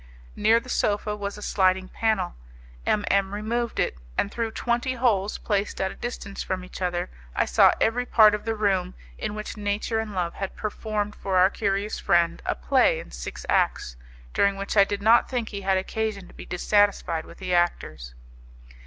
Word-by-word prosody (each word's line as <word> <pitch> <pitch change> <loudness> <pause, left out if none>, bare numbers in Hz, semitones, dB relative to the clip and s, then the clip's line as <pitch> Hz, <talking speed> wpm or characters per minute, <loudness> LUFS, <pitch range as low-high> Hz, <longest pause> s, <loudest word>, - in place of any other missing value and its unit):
Near 220 +2 +4
the 235 - -15
sofa 210 -3 0
was 200 0 -5
a 210 - -8
sliding 185 -1 +2
panel. 215 -5 0 0.5
M 210 -1 +2
M 195 0 +1
removed 230 +2 -2
it, 65 - 0 0.2
and 200 - +1
through 230 -1 -2
twenty 240 +3 -1
holes 215 -5 +1
placed 205 -1 -2
at 190 0 0
a - - -10
distance 220 -4 -6
from 185 -1 -3
each 185 - -10
other 180 0 -1 0.2
I - - +2
saw - - +5
every 245 +2 +1
part 215 -2 +6
of 210 - -2
the 225 0 -2
room 190 -4 0 0.2
in 210 -1 -3
which 215 +1 -6
nature 210 +2 -1
and 215 -2 -4
love 175 -2 -1
had 195 -1 -5
performed 210 -1 -3
for 190 -1 -1
our 185 +2 +5
curious 200 0 -1
friend 170 -1 +2
a - - +1
play - - +3
in - - -10
six - - -7
acts, - - +1 0.4
during 200 0 +3
which 195 +2 -4
I 200 -1 +7
did 200 0 -4
not 230 +2 +5
think 245 -4 -2
he 200 -2 -6
had 190 0 +2
occasion 200 0 -3
to - - -16
be - - -11
dissatisfied 180 -3 +1
with - - -13
the 185 -2 -3
actors. 115 - -1
205 Hz, 190 wpm, -25 LUFS, 185-220 Hz, 0.5 s, I